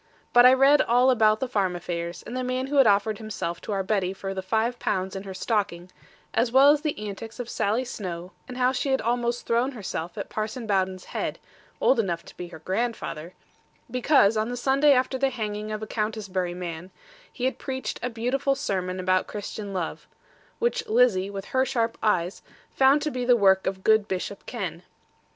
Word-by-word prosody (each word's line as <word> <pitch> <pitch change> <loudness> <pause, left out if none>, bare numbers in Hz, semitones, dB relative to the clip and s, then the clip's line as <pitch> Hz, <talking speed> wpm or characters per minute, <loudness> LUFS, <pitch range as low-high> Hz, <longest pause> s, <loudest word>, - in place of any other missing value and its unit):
But 245 +1 +8
I 255 - +7
read 275 +3 +6
all 245 +2 +4
about 215 -3 +3
the 260 - 0
farm 195 -7 0
affairs, 170 0 -5
and 240 - -7
the 255 - -2
man 255 +1 -1
who 285 +2 -2
had 270 -4 +7
offered 205 +1 +2
himself 190 -6 -4
to - - -6
our 195 -1 0
Betty 190 -2 0
for 195 0 -5
the 190 - -3
five 225 +5 0
pounds 190 0 -1
in 195 - -4
her 195 -1 -8
stocking; 185 -4 -2 0.4
as 230 +1 +1
well 270 +3 +7
as 295 0 +2
the 305 -2 -2
antics 225 +4 -8
of 245 - -4
Sally 225 +3 0
Snowe, 180 -6 -6 0.2
and 250 - -8
how 255 0 +3
she 265 +1 -2
had 265 - +2
almost 240 +1 -1
thrown 240 +4 +1
herself 180 -6 -5
at - - -4
Parson 220 +3 -4
Bowden's 190 -3 0
head - - -3 0.4
(old 260 - +3
enough 175 -6 -1
to - - -13
be 180 - -7
her 170 - -10
grandfather), 185 -2 -3 0.6
because 250 -4 +4
on 215 +2 0
the 245 - -4
Sunday 275 +4 +4
after 260 0 +1
the 270 0 +2
hanging 215 -3 -4
of 215 0 -4
a - - -5
Countisbury 205 -5 -2
man, 175 0 -6 0.4
he 250 - -4
had 260 - -1
preached 260 -1 -4
a 250 - -2
beautiful 250 +4 0
sermon 185 -8 -2
about 185 0 +1
Christian 205 0 -6
love; 180 -4 -4 0.5
which 470 -1 -1
Lizzie, 235 - +3
with 200 -1 -6
her 260 0 +4
sharp 230 -3 0
eyes, 180 -3 0 0.3
found 275 +2 +4
to 305 - -1
be 250 -2 -3
the 245 0 +5
work 190 -2 +4
of 190 0 -3
good 220 -1 +4
Bishop 190 +1 -4
Ken. 185 -8 -4
220 Hz, 200 wpm, -26 LUFS, 190-250 Hz, 0.6 s, But